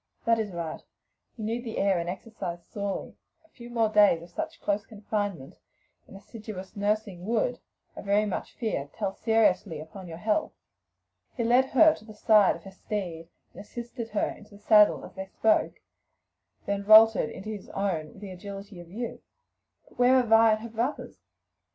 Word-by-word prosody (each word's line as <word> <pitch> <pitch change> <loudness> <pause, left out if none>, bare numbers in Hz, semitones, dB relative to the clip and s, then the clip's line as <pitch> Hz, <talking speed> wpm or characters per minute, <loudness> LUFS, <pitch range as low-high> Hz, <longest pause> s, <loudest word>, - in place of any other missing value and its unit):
"That 230 0 +3
is 210 -2 -2
right; 170 -2 -5 0.6
you 215 - -5
need 230 +2 -2
the 225 -3 -6
air 195 -3 +2
and 170 +1 -3
exercise 180 -3 -6
sorely; 200 -1 -5 0.3
a - - -27
few 240 -4 -12
more 230 -2 +2
days 205 -6 +4
of 170 - -14
such - - -5
close 205 +1 -1
confinement 205 - -4 0.5
and 195 - -12
assiduous 210 -1 -9
nursing 205 -3 -1
would, 370 - 0 0.4
I - - -7
very 205 +1 +2
much 205 - -4
fear, 180 - -3
tell 195 - -2
seriously 195 -8 +1
upon 170 +4 -10
your 165 -1 -8
health." 215 - 0 0.8
He 235 - 0
led 245 +3 +4
her 310 +4 +5
to - - -13
the 215 -1 -12
side 210 -2 +5
of 170 - -13
her 195 - -10
steed 180 -5 -5 0.2
and - - -10
assisted 235 +2 -7
her 210 - 0
into 210 -1 -10
the 205 - -18
saddle 210 -2 +5
as - - -14
he 190 0 -5
spoke, 220 +3 +1 0.9
then 200 0 -1
vaulted 215 -4 +7
into 215 - -8
his 210 -3 -7
own 185 -6 -2
with 190 - -16
the 200 -2 -7
agility 195 +1 -9
of 175 -1 -12
youth. 235 +6 -6 0.7
"But - - -23
where 250 +1 +6
are 255 - +5
Vi 225 -1 +6
and 215 - -2
her 230 - -7
brothers?" 235 +6 -3
210 Hz, 180 wpm, -27 LUFS, 190-225 Hz, 0.9 s, vaulted